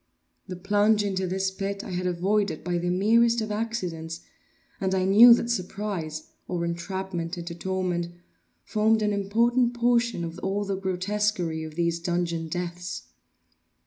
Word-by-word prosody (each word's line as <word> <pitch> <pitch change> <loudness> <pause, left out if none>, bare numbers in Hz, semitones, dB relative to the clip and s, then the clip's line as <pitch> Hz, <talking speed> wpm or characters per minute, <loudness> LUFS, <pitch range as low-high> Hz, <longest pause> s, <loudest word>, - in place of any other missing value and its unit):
The 185 - -5
plunge 205 +3 +2
into 190 -2 -1
this 190 +1 -1
pit 195 +1 -4
I - - -7
had 180 0 -2
avoided 180 -1 0
by 175 0 -1
the 175 +1 -1
merest 230 +6 +3
of 215 -1 -3
accidents, 180 -7 -3 0.6
I 190 -1 +1
knew 215 +6 +9
that 235 0 -2
surprise, 185 -6 -4 0.2
or 175 -2 -2
entrapment 175 0 -4
into 170 0 -5
torment, 180 -1 -2 0.6
formed 220 +1 +2
an 210 0 +1
important 235 +5 +2
portion 235 -5 +2
of 165 +1 -6
all 200 +2 -1
the 195 -1 -1
grotesquerie 190 -3 -1
of 155 -1 -8
these 170 0 0
dungeon 170 -1 -1
deaths. 175 +1 -4
190 Hz, 145 wpm, -26 LUFS, 175-210 Hz, 0.6 s, knew